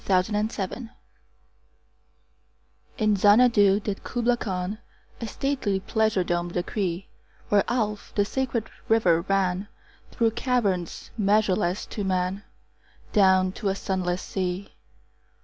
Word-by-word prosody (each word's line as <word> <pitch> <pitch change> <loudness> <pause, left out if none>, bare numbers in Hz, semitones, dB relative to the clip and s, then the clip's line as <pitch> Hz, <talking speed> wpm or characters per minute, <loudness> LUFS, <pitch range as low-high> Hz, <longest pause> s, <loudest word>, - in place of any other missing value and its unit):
Kubla 185 +2 +2 0.2
Khan 195 -1 -4 2.2
IN 215 -2 +2
Xanadu 205 -1 +5
did 200 -1 -4
Kubla 240 0 +1
Khan 190 -1 -3 0.4
A 230 - -3
stately 255 -6 -1
pleasure 215 -1 +1
dome 175 0 -1
decree: 180 +1 -2 0.4
Where 205 -1 +4
Alph, 215 -4 -2
the 205 - +3
sacred 245 -1 -2 0.2
river, 180 -7 +4
ran 195 +1 0 0.4
Through 230 -2 +1
caverns 210 -8 -1
measureless 200 -2 +2
to 205 - -5
man 185 +1 -1 0.7
Down 190 -2 +4
to 200 +1 -3
a 190 - 0
sunless 185 -2 -2
sea. 185 +1 -3
200 Hz, 110 wpm, -25 LUFS, 185-220 Hz, 2.2 s, Xanadu